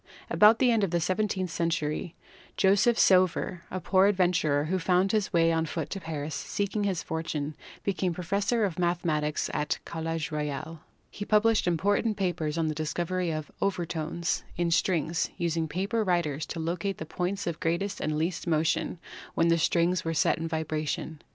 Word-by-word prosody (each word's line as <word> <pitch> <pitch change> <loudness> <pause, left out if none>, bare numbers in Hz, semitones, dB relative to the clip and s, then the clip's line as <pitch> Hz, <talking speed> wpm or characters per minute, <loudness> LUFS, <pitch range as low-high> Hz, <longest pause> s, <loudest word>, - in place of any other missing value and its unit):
About 215 +2 +6
the 250 -1 +4
end 225 -3 +2
of 195 - +1
the 170 +1 +1
seventeenth 185 0 -1
century 165 0 -2 0.4
Joseph 205 +5 +4
Sauveur, 185 -1 +3
a 185 - -3
poor 190 +1 +4
adventurer 175 -7 +2
who 185 +4 0
found 180 +2 +2
his 215 -2 0
way 165 -2 +4
on 165 0 0
foot 160 -1 -4
to 195 - -3
Paris 155 -3 -5
seeking 200 +8 -2
his 190 -4 -1
fortune, 155 -2 -3 0.3
became 190 -2 0
professor 200 +6 0
of 180 -3 -4
mathematics 165 -4 0
at 150 0 -1
the - - +1
College 165 -1 -3
Royal. 150 +1 -4 0.3
He 205 - -6
published 215 -1 +3
important 205 +5 +1
papers 175 -5 -1
on 165 -1 +1
the 155 - -1
discovery 170 +3 -2
of 155 -1 -4
"overtones" 170 -3 -1
in 170 -1 0
strings, 165 -1 +1
using 165 -1 0
paper 195 +8 -1
riders 165 -6 0
to 165 - -5
locate 170 +4 -2
the 160 - -6
points 180 +4 -3
of 170 -1 -3
greatest 180 +5 -1
and 155 0 -1
least 165 +3 -2
motion 160 +2 +1 0.4
when 165 0 +3
the 165 0 +3
strings 170 +2 +2
were 165 0 -2
set 155 - +2
in 165 - -2
vibration. 155 -1 -3
170 Hz, 170 wpm, -28 LUFS, 160-190 Hz, 0.4 s, About